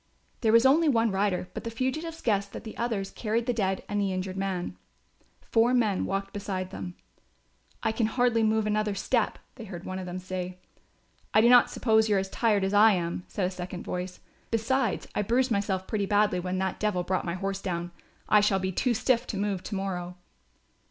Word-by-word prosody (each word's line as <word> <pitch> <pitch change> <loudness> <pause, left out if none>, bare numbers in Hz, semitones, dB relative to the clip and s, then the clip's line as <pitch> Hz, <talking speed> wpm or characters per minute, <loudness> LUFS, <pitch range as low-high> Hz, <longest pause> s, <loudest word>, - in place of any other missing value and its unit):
There 220 - +2
was 230 +2 +6
only 305 +4 +5
one 230 -4 +3
rider, 190 -2 0
but - - -6
the 230 - -3
fugitives 310 +8 -3
guessed 200 -3 0
that - - -7
the 220 - -8
others 220 -5 -2
carried 225 +1 -1
the 245 - +1
dead 195 -4 -1
and 205 0 -1
the 195 -1 0
injured 185 0 -3
man. 190 -2 -3 0.8
Four 235 +2 +4
men 215 -6 +2
walked 195 0 -3
beside 190 -2 -4
them. 180 -1 -6 0.9
"I - - +2
can 220 0 +1
hardly 240 0 +2
move 220 0 +2
another 210 -1 0
step," 230 +3 0 0.2
they 230 - -8
heard 180 -4 -8
one 185 0 -4
of 185 - -6
them 180 +1 -4
say. 185 0 -5 0.8
"I 215 - +7
do 235 - +5
not 245 0 +7
suppose 220 -2 +2
you 205 - +3
are - - +3
as 190 0 -2
tired 215 -4 +2
as 195 +1 0
I 210 +1 +7
am," 175 -1 -2
said 195 - -2
a 180 - -1
second 180 0 -6
voice, 180 0 -5 0.3
"besides 230 0 0
I - - 0
bruised 245 +5 +1
myself 200 -2 0
pretty 205 -1 -1
badly 205 -2 +3
when 180 +1 -2
that 190 0 -2
devil 210 -4 0
brought 185 +1 -1
my 170 0 -3
horse 195 +1 -3
down. 175 -2 -3 0.4
I 210 - +6
shall 205 -1 +3
be 190 0 -1
too 240 +6 +1
stiff 245 +2 +1
to 205 - -3
move 200 -2 -1
to 205 - -5
morrow." 180 -2 -4
200 Hz, 210 wpm, -28 LUFS, 185-225 Hz, 0.9 s, I